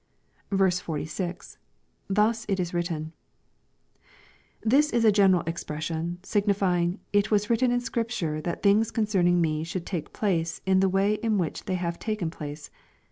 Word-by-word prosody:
46, 180 -2 -2 0.2
— - - -43
[TTius 220 +3 +2
it 195 -1 0
18 180 - +1
written^ 165 -3 -2 1.5
This 280 +7 +4
is 235 -4 +1
a 215 - +7
general 195 -4 +4
expression, 165 +1 -3
signifying 195 -3 +1
* - - -41
It 205 +1 +3
was 210 +1 +1
written 240 +2 +3
in 245 0 +1
Scripture 230 -11 -2
that 170 +2 -4
things 210 +2 +4
concerning 190 -6 +2
me 155 -2 0
should 175 +1 -5
take 170 -5 -4
place 170 -6 -1
in 190 0 +4
the 190 0 +3
way 195 +3 +1
in 225 -3 +1
which 170 -5 -2
they 190 -3 -1
have 170 -1 -3
taken 215 -7 -2
place.'' 150 -1 -8
190 Hz, 155 wpm, -26 LUFS, 170-210 Hz, 1.5 s, a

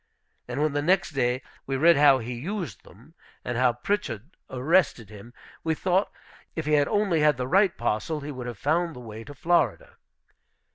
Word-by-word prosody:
And - - -4
when 155 -2 +1
the 145 - 0
next 180 +3 +2
day 125 -2 0 0.2
we 135 0 -1
read 165 +4 +6
how 145 -1 +6
he 125 0 -5
used 175 - -5
them, 120 - -18 0.3
and 120 - -2
how 125 0 +3
Pritchard 135 - -3
arrested 130 - +1
him, 105 +3 -12 0.3
we 160 -1 0
thought 185 +4 +1 0.4
if 160 - -3
he 150 - 0
had 145 -1 +4
only 205 -6 +1
had 150 -3 +3
the 125 - -2
right 190 +4 +3
parcel 120 +7 -1
he 145 +1 -6
would 125 -3 -6
have 120 -3 -6
found 165 - 0
the - - -9
way 110 -2 -9
to 145 +4 -11
Florida. 175 +5 0
145 Hz, 190 wpm, -26 LUFS, 125-170 Hz, 0.4 s, read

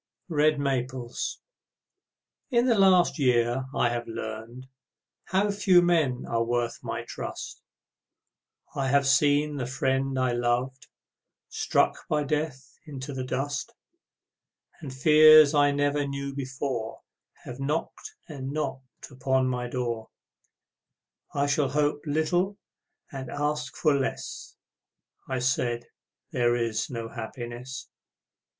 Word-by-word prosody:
Red 155 -1 +3
Maples 130 -3 -2 1.1
In 240 -2 +3
the 250 - +4
last 185 -3 +5
year 125 -1 +2
I 120 - +2
have 120 0 -3
learned 115 +3 -7 0.6
How 200 +2 +1
few 190 -3 +4
men 155 -8 +1
are 115 0 +1
worth 120 0 -1
my - - -4
trust; - - -7 1.1
I 135 -1 0
have 140 +1 +3
seen 145 +1 +3
the 125 -3 -3
friend 135 +1 0
I 130 -1 +1
loved 120 +2 -1 0.6
Struck - - 0
by 150 -1 +1
death 140 -4 -3
into 140 -1 -6
the 130 -1 -3
dust, 140 - -3 1.0
And 145 -6 -7
fears 155 +2 +7
I 145 -1 +5
never 145 0 0
knew 140 0 -4
before 130 -4 -4 0.4
Have 125 +2 -8
knocked 150 +4 -3
and 135 -3 -6
knocked 140 -3 -5
upon 130 0 +1
my 125 -1 -2
door 120 -3 -3 1.3
"I 140 0 +2
shall 140 -1 +1
hope 145 +1 0
little 175 +6 0 0.5
and 135 -2 -6
ask 145 -3 -2
for 155 - +2
less," 135 -1 -3 0.7
I 130 - -1
said, 125 -2 0 0.5
"There 120 -1 +2
is 115 -2 -1
no 115 -3 -5
happiness." 120 +2 -7
135 Hz, 120 wpm, -27 LUFS, 125-150 Hz, 1.3 s, fears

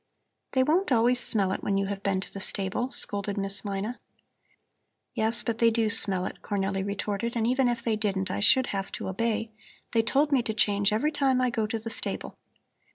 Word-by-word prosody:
"They 260 -1 +3
won't 320 +4 +1
always 245 +1 +3
smell 200 -6 +1
it - - -3
when 195 - 0
you 195 - 0
have 195 0 -5
been 195 -2 -1
to - - -9
the 195 - -6
stable," 200 +6 -3
scolded 205 -4 -1
Miss 195 0 +6
Mina. 205 +4 -4 1.1
"Yes, 225 +2 0
but 230 -1 -3
they 230 - +5
do 225 -1 +1
smell 195 -4 +1
it," - - -7
Cornelli 195 -1 -2
retorted, 205 +3 -3
"and 225 -1 0
even 255 +2 +2
if 240 -1 -2
they 230 -2 0
didn't, 190 -3 -2
I - - -3
should 255 +5 +5
have 195 -1 -4
to - - -5
obey. 225 +2 -2 0.4
They 230 - +3
told 280 +6 +1
me 270 -3 +3
to 220 -2 -4
change 205 -1 +3
every 275 +9 0
time 275 -3 +1
I 250 -1 +1
go 220 -2 -1
to 225 - -3
the 225 +1 -7
stable." - - -1
220 Hz, 210 wpm, -27 LUFS, 200-240 Hz, 1.1 s, Miss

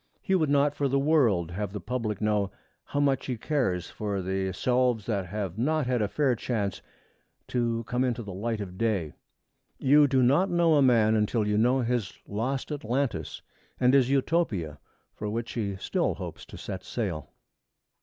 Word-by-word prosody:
He 190 - -2
would 160 -6 +2
not 145 0 +3
for 145 -1 0
the 135 +1 +1
world 125 - +2
have 100 +2 -4
the 105 - -4
public 110 0 -3
know 105 -2 +1 0.4
how 145 - -2
much 140 -2 +1
he 125 -3 -2
cares 110 - -1
for 105 -2 -3
the 95 +1 -1
selves 125 +1 +1
that 100 -5 -1
have 100 0 -4
not 155 +3 +1
had 125 -2 0
a 105 - +1
fair 135 +3 +1
chance 105 -4 -2 0.7
to 115 -2 0
come 125 +2 -1
into 120 -2 -1
the 100 -2 -7
light 110 +3 -2
of 95 -2 -7
day. 100 -9 0 0.6
You 145 +2 +5
do 130 -2 +3
not 145 +10 +4
know 170 -2 +3
a 145 - +5
man 115 -5 +4
until 105 0 +1
you 105 - +1
know 125 +5 +3
his 120 -4 -1
lost 130 +8 -2
Atlantis, 125 - -2 0.4
and 125 0 +4
his 135 -2 +4
Utopia 130 - 0 0.3
for 105 - -5
which 115 +2 -3
he 100 -4 -2
still 95 - -1
hopes - - -7
to - - -10
set 95 -2 -6
sail. 90 - -4
115 Hz, 180 wpm, -27 LUFS, 100-135 Hz, 0.7 s, You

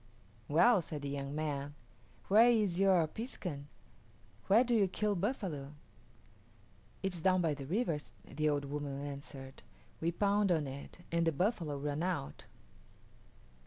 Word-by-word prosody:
"Well," 180 +8 +5
said 150 -3 -7
the 140 - -3
young 140 0 -4
man, 145 -2 -3 0.5
"where 220 +5 +7
is 210 -7 +2
your 190 -4 +4
piskun 175 - -5 0.8
where 215 +5 +6
do 245 -1 0
you 210 -4 +4
kill 210 +3 0
buffalo?" 175 - -3 1.3
"It 190 -1 0
is 170 - -5
down 185 +1 +4
by 165 -4 +1
the 140 -2 -7
river," 175 - 0 0.3
the 155 0 0
old 145 -1 0
woman 140 -1 -4
answered. 140 -1 -8 0.4
"We 165 +1 0
pound 200 +2 +2
on 160 -4 +2
it 135 +1 -8
and 170 0 +2
the - - +4
buffalo 165 - -1
run 145 +2 -2
out." 175 -6 -3
165 Hz, 145 wpm, -34 LUFS, 145-195 Hz, 1.3 s, where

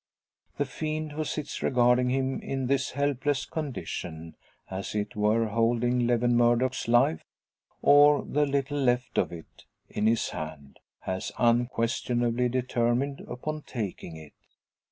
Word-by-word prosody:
The 145 - +1
fiend 155 +2 -4
who 155 +1 -3
sits 150 -1 -4
regarding 125 0 +3
him 130 +1 0
in 135 -1 -3
this 130 0 0
helpless 140 0 0
condition 85 - -5 0.3
as 95 +2 -5
it 105 -1 -2
were 105 +2 +2
holding 120 +2 +1
Lewin 120 0 +2
Murdock's 120 +2 +2
life, 120 -9 +3 0.6
or 145 0 +6
the 150 +1 +1
little 140 +1 -1
left 125 -2 +1
of - - 0
it, 85 -2 -12 0.2
in 105 +1 0
his 115 0 +2
hand 75 -3 -8 0.2
has 95 +2 -4
unquestionably 120 0 +1
determined 125 +2 0
upon 155 +5 -5
taking 100 - -6
it. 80 -2 -13
125 Hz, 130 wpm, -27 LUFS, 115-135 Hz, 0.6 s, or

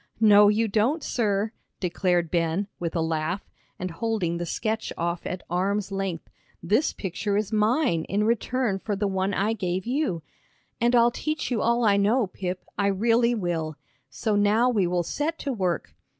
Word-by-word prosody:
"No, 210 -2 +7
you 220 +2 +2
don't, 230 +10 +1
sir," 210 -2 0 0.3
declared 175 -2 0
Ben, 170 +3 0
with 170 -1 -3
a 165 - +1
laugh, 160 +4 -2 0.3
and 185 0 -4
holding 180 -3 -1
the 175 0 -4
sketch 220 +5 -2
off 170 +1 -2
at 185 - -5
arm's 195 +3 -1
length; 195 -4 -3 0.4
"this 215 - +2
picture 200 +2 -2
is 210 +1 -2
mine 215 - +2
in 205 +2 0
return 235 -1 0
for 205 +1 -2
the 205 +1 -1
one 190 0 0
I 205 +3 +1
gave 185 -3 -2
you. 245 - -1 0.6
And 240 +1 +3
I'll 240 0 +5
teach 305 +3 -3
you 230 - +1
all 235 0 +2
I 200 -2 +4
know, 215 +5 +3
Pip, 185 -1 -5
I 200 - +3
really 230 +4 +3
will. 165 -6 -2 0.3
So 215 -3 -1
now 210 +5 +3
we 200 -6 +2
will 175 0 0
set 300 - -2
to 275 - -3
work." 185 -7 -2
200 Hz, 175 wpm, -26 LUFS, 180-225 Hz, 0.6 s, No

